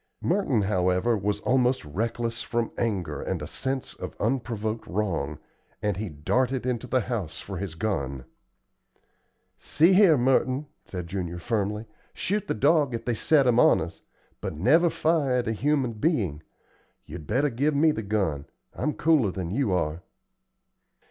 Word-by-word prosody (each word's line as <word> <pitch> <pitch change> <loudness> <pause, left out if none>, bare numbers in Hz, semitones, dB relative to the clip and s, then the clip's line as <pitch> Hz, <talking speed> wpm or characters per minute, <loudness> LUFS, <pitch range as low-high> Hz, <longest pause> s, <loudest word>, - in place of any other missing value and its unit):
Merton, 165 - +1
however, 95 +3 +2
was 105 0 -1
almost 125 -3 +2
reckless 115 +8 -2
from 120 -1 -2
anger 100 -7 -2
and - - -2
a - - -5
sense 130 0 -3
of - - -7
unprovoked 115 -2 -2
wrong, 85 -8 -2 0.4
and 105 -2 -1
he 105 +2 -4
darted 125 - 0
into 125 -1 -2
the 130 +1 +2
house 100 -9 -4
for 95 -2 -6
his 90 -3 -5
gun. 70 - -2 1.3
"See 165 +5 +3
here, 185 -5 +6
Merton," 130 +2 +2 0.2
said 90 -2 -6
Junior, 85 -1 -4
firmly, 105 +2 -2 0.3
"shoot 205 +2 -1
the - - -1
dog 140 +1 +3
if 115 - -6
they 120 - +1
set 140 +5 +3
him 120 -1 +4
on - - +6
us, - - -6 0.4
but - - -4
never 155 - +4
fire 155 -5 +1
at 125 -1 0
a - - +1
human 135 0 0
being. 105 - 0 0.6
You'd 80 0 -9
better 140 +2 +1
give 140 +6 +1
me 155 +2 +4
the 110 - -3
gun; 95 -9 -1 0.3
I - - -8
am 150 - +1
cooler 150 -10 +3
than 90 -2 -4
you 115 0 0
are." 85 -2 -1
115 Hz, 160 wpm, -26 LUFS, 95-135 Hz, 1.3 s, here